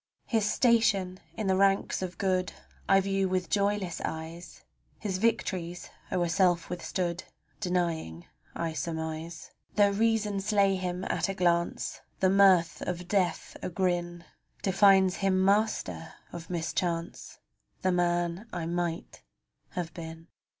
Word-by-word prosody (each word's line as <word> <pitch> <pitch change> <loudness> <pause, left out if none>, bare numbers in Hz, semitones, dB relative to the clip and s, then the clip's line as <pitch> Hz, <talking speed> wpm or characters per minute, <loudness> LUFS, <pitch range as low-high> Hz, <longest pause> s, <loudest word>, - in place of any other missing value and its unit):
His 215 -3 +1
station 205 -6 +2 0.2
in 220 - -2
the 190 -1 +3
ranks 195 0 +2
of 185 -1 -5
good 185 -2 0 0.4
I 195 - +6
view 195 0 0
with 185 -1 -1
joyless 200 -3 0
eyes; 165 +2 -6 0.3
His 190 -3 -3
victories 180 -5 -1 0.2
o'er 175 -2 +1
self 175 -1 +2
withstood 180 0 -3 0.3
Denying 170 - -2 0.3
I 165 -1 -2
surmise. 160 0 -5 0.2
Tho' 205 -1 +5
reason 210 -1 +1
slay 200 -1 +2
him 180 0 -3
at - - 0
a 195 - -2
glance, 170 -2 0 0.2
The 190 -1 +3
mirth 190 -4 +5
of 180 0 -4
Death 180 -4 0
agrin 175 -1 -1 0.4
Defines 190 -1 +5
him 190 -1 +2
master 200 -5 0 0.2
of 170 -1 -8
mischance 170 0 -3 0.2
— - - -44
The 185 - +3
man 175 +3 0
I 175 -2 -3
might 170 0 -3 0.5
have 170 -2 -4
been. 165 0 -9
180 Hz, 130 wpm, -29 LUFS, 170-195 Hz, 0.5 s, I